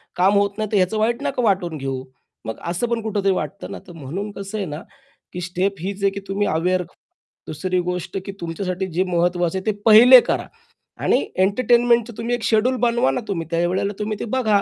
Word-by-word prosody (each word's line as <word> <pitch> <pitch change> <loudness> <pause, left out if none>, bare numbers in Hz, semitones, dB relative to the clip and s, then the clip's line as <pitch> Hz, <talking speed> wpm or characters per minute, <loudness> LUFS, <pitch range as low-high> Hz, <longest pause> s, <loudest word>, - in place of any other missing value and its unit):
काम 190 +3 +3
होत 200 +1 +1
नाहीतर 215 0 -2
ह्याचं 190 +3 +1
वाईट 235 +4 0
नाका 275 -3 -1
वाटून 185 -6 +1
घेऊ. 135 -2 -4 0.4
मग 110 - -5
असं 180 +8 -1
पण 235 -1 -1
कुठेतरी 205 -3 0
वाटतं 200 +2 -5
ना. - - -6
तर - - -10
म्हणून 190 +10 -5
कसं 200 +2 -6
आहे 200 - -2
ना, 150 +1 -6 0.5
की 180 - -5
स्टेप 185 +3 -1
हीच 195 +3 -5
आहे 195 - +5
की 200 - -5
तुम्ही 200 +1 0
अवेअर 180 +3 +1 0.7
दुसरी 180 +4 -1
गोष्ट 180 +1 -3
की 195 - -5
तुमच्यासाठी 180 +2 -3
जे 185 - +3
महत्त्वाचं 175 0 0
आहे, 190 - -6
ते 215 - +2
पहिले 240 +4 +9
करा. - - -1 0.6
आणि - - +2 0.2
एंटरटेनमेंटच 235 +2 +3
तुम्ही 235 +1 -1
एक 240 - -7
शेड्यूल 230 +4 +2
बनवा 240 +1 +2
ना, - - -2
तुम्ही 165 -6 -3
त्यावेळेला 175 +4 0
तुम्ही 210 0 -2
ते - - -3
बघा. 215 -6 +3
195 Hz, 195 wpm, -21 LUFS, 180-220 Hz, 0.7 s, पहिले